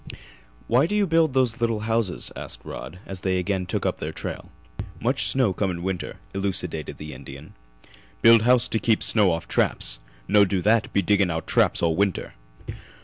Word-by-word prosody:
"Why 125 +6 +3
do 210 - -2
you 210 -1 +3
build 165 -5 +2
those 125 -2 +1
little 115 -2 0
houses?" 110 -3 -1
asked - - -8
Rod, 80 +6 -8
as 95 -2 -7
they 95 -1 0
again 90 0 -1
took - - -2
up - - -1
their - - -4
trail. - - -6 0.5
"Much 125 +6 +1
snow 130 -7 +2
come 95 +1 -1
in 85 -1 -4
winter," 95 -1 -3 0.2
elucidated 95 -5 -3
the 75 0 -8
Indian. 70 +2 -11 0.7
"Build 115 -1 +8
house 125 +1 +4
to 110 - 0
keep 110 -1 +1
snow 105 -4 +4
off 85 -1 -2
traps. - - 0 0.3
No 105 0 +5
do 95 -1 0
that, 110 +1 +2
be 100 - +1
digging 100 0 +2
out 80 -1 -3
traps - - +2
all 80 -1 +2
winter. 100 0 -1
100 Hz, 185 wpm, -24 LUFS, 90-115 Hz, 0.7 s, Build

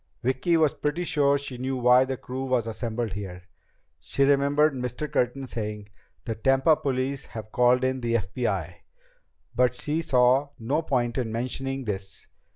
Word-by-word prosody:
Vicki 130 +7 +2
was 155 -3 +3
pretty 150 +4 -2
sure 140 -3 +2
she 135 -3 -7
knew 130 +1 -2
why 125 +1 +5
the 130 0 -3
crew 130 +2 -5
was 125 -3 +1
assembled 115 -1 -3
here. 90 -3 -7 0.6
She 140 - 0
remembered 140 +2 +3
Mr. 125 +3 -4
Curtin 130 0 -1
saying: 105 -4 -5 0.4
"The 115 - -2
Tampa 135 +7 +3
police 135 -1 -2
have 110 -2 -9
called 125 +1 +3
in 130 0 0
the 115 -1 0
FBI." 100 -4 -2 0.8
But 125 0 +2
she 150 +5 -1
saw 130 0 +3
no 135 +6 0
point 125 -5 0
in 115 -3 -2
mentioning 135 +3 -3
this. 95 -2 -4
125 Hz, 160 wpm, -26 LUFS, 115-140 Hz, 0.8 s, why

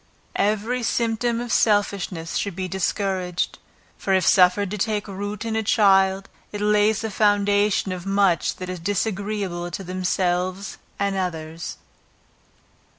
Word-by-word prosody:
Every 215 +4 0
symptom 230 0 0
of 240 0 -4
selfishness 200 -5 +1
should 200 -4 -2
be 185 0 -3
discouraged, 185 -1 -2 0.4
for 195 - +1
if 185 - +2
suffered 185 +1 +4
to 210 - -3
take 210 0 -1
root 205 +2 -5
in 225 -1 -2
a 220 - +1
child, 195 -2 +3 0.2
it 205 - -5
lays 210 +1 +3
the 220 -1 -3
foundation 205 -1 +2
of 180 -1 -5
much 195 -3 +2
that 185 - -7
is 185 -1 -5
disagreeable 200 -2 -2
to 175 +3 -6
themselves 185 +1 -1 0.2
and 200 -1 0
others. 165 -3 -4
200 Hz, 135 wpm, -23 LUFS, 185-210 Hz, 0.4 s, suffered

